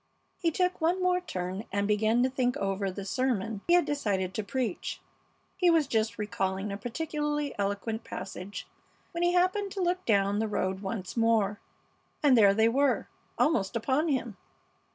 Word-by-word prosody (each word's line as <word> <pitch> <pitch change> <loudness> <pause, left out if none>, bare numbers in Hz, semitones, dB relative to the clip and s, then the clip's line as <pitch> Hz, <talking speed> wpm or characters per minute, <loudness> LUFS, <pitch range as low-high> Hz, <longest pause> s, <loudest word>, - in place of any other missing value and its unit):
He 340 - +2
took 360 +2 0
one 340 +3 +2
more 365 0 +2
turn 185 - -4
and 200 0 0
began 220 +3 +3
to 260 - +2
think 250 -1 0
over 195 0 -1
the 190 +1 -6
sermon 225 -3 -1
he 345 - +6
had 355 - +4
decided 200 -10 -1
to 215 - -2
preach. 230 -1 -3 0.6
He 360 -2 +3
was 325 -3 +4
just 220 -2 0
recalling 195 -1 -2
a 200 - -3
particularly 295 +4 -2
eloquent 205 +3 -2
passage 195 +1 -7 0.5
when 340 - -4
he 350 0 +3
happened 370 +3 +2
to 395 - -5
look 365 0 0
down 200 -1 +3
the 220 - 0
road 190 -2 -1
once 190 -2 -4
more, 225 -3 +2 0.6
and 280 -3 +6
there 200 -4 +6
they 220 +1 +4
were, 270 +3 +1 0.3
almost 205 -12 +1
upon 265 +7 +1
him! 245 -8 -1
225 Hz, 170 wpm, -29 LUFS, 200-295 Hz, 0.6 s, he